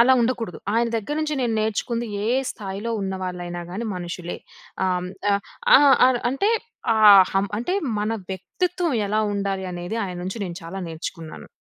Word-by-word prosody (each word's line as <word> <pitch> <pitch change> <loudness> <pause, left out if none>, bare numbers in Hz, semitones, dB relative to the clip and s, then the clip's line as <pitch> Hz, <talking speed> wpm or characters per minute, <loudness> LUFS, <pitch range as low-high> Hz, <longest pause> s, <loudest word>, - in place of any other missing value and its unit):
అలా 250 +3 +7
ఉండకూడదు. 230 -5 -1 0.2
ఆయన 235 +1 +2
దెగ్గర‌నుంచి 300 +7 -2
నేను 230 -2 0
నేర్చుకుంది, 230 +2 -1 0.2
ఏ - - +1 0.2
స్థాయిలో 200 +2 -5
ఉన్న 190 0 -2
వాళ్ళయినా 175 -1 -5
గానీ 215 +6 -4
మనుషులే. 175 0 -5 0.5
అం 180 -1 0 0.3
ఆ - - +5 0.4
ఆ! - - +8 0.3
అ - - +6 0.2
అంటే 275 - +1 0.4
ఆ - - 0 0.4
హం 195 +1 +2
అంటే 300 - -1 0.3
మన 210 +2 -1 0.2
వ్యక్తిత్వం 345 - -2 0.2
ఎలా 215 +2 +1
ఉండాలి 195 -1 -2
అనేది 175 +5 -4
ఆయన్నుంచి 180 +4 -5
నేను 175 -2 -6
చాలా 170 +4 -6
నేర్చుకున్నాను. 160 0 -7
200 Hz, 150 wpm, -23 LUFS, 180-235 Hz, 0.5 s, ఆ